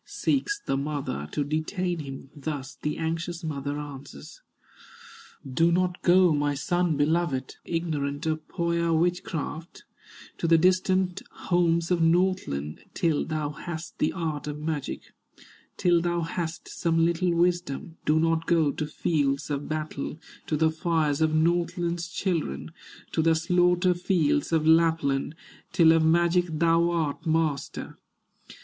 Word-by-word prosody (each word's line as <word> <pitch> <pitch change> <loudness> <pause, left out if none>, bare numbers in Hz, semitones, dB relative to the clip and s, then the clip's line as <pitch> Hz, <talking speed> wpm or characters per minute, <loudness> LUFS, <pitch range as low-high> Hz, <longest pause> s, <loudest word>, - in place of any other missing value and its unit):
Seeks 405 +9 -1
the 135 - 0
mother 135 - -3
to 145 - -1
detain 170 +4 -2
him, 135 -2 -8
Thus 145 -2 -5
the 150 - -2
anxious 165 +2 -3
mother 145 -2 -3
answers: 140 - -9 1.1
"Do 165 +6 +2
not 180 0 0
go, 180 -1 +5
my 145 -1 0
son 175 +2 0
beloved, 145 -3 0
Ignorant 150 -4 -2
of 155 -1 -2
Pohya 170 -1 0
witchcraft, 165 -1 -2 0.6
To 170 - 0
the 165 0 +6
distant 185 +1 +2
homes 170 -1 +1
of 175 -2 +2
Northland 165 - +1
Till 165 -5 +1
thou 155 -2 -2
hast 160 +2 -7
the 155 - +2
art 155 -5 -3
of 150 0 -4
magic, 150 -2 -3 0.8
Till 175 -1 +3
thou 175 0 0
hast 165 0 -4
some 165 -1 +1
little 170 +1 +1
wisdom; 175 -2 0
Do 155 +1 +3
not 165 0 +1
go 160 -4 +3
to 150 +2 -4
fields 145 -2 0
of 145 0 -3
battle, 155 -1 -4 0.3
To 155 - 0
the 160 +1 +3
fires 160 -2 0
of 155 0 +2
Northland's 170 +1 0
children, 170 - -2 0.4
To - - +1
the 165 0 +4
slaughter 180 +2 +3
fields 170 -5 +1
of 160 -2 +2
Lapland, 160 -3 +3 0.4
Till 170 -3 +6
of 165 0 +4
magic 170 +2 +3
thou 165 +2 +2
art 165 -1 -2
master. 155 -3 -1
165 Hz, 135 wpm, -26 LUFS, 150-175 Hz, 1.1 s, the